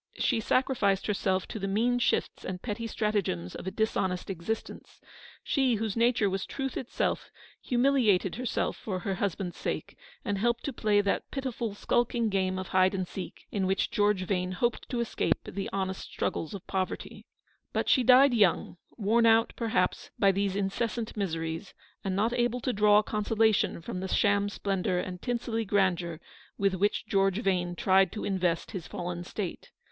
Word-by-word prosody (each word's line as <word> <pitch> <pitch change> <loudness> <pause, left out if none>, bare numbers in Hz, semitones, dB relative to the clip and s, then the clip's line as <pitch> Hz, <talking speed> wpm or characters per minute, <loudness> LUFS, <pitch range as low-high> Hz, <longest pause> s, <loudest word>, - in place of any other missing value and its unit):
She 240 - +1
sacrificed 220 -5 +1
herself 190 -2 0
to 220 - -5
the 195 - -2
mean 235 +5 +2
shifts - - 0
and 185 -1 -4
petty 230 +2 -4
stratagems 200 - -1
of - - -7
a - - +2
dis 220 +3 -1
honest 185 0 -1
existence. 190 +5 -5 0.4
She, 265 -4 +2
whose 215 -2 -2
nature 235 -2 +3
was 190 0 -2
truth 270 -1 -4
itself, 250 - -2 0.3
humiliated 240 -8 +2
herself 250 -1 -1
for 190 -4 -4
her 195 - -1
husband's 185 -1 -2
sake, - - -3
48 - - -32
Eleanor's - - -23
victory. - - -8
and 200 - 0
helped 235 +2 +1
to 280 - -3
play 210 -3 +2
that 200 -1 -1
pitiful, 240 -6 -3
skulking 240 +1 +1
game 190 -2 0
of 185 - -5
hide 185 +1 +3
and 185 -2 -2
seek 190 - -8
in 195 -2 0
which 190 0 0
George 205 -2 +2
Vane 185 -1 -1
hoped 235 +6 -1
to 240 -2 -1
escape 235 - 0
the 195 - -5
honest 190 -1 -2
struggles 165 +5 -2
of 195 - -9
poverty. 190 -1 -4 0.4
But - - -1
she 260 - +5
died 255 +2 +7
young, 200 -5 +2 0.2
worn 230 +2 +3
out, 225 0 +4
perhaps, 220 -6 0
by 195 -1 +5
these 195 0 -1
incessant 220 +3 -2
miseries, 165 -2 -3 0.3
and 190 -1 -1
not 220 +4 +1
able 240 0 +1
to 255 - -1
draw 210 0 +5
con 210 0 -2
solation 220 -5 +2
from 180 - -4
the 190 - -3
sham 200 +2 +2
splendour 195 -3 -1
and 180 0 -4
tinselly 235 -2 -1
grandeur 180 -5 +1 0.4
with 195 -1 +2
which 200 +3 0
George 195 -1 +2
Vane 180 -3 0
tried 190 +1 +4
to 215 - -4
invest 180 -4 0
his 185 -5 -6
fallen 175 0 -4
state. 190 0 -5
200 Hz, 180 wpm, -29 LUFS, 185-230 Hz, 0.4 s, died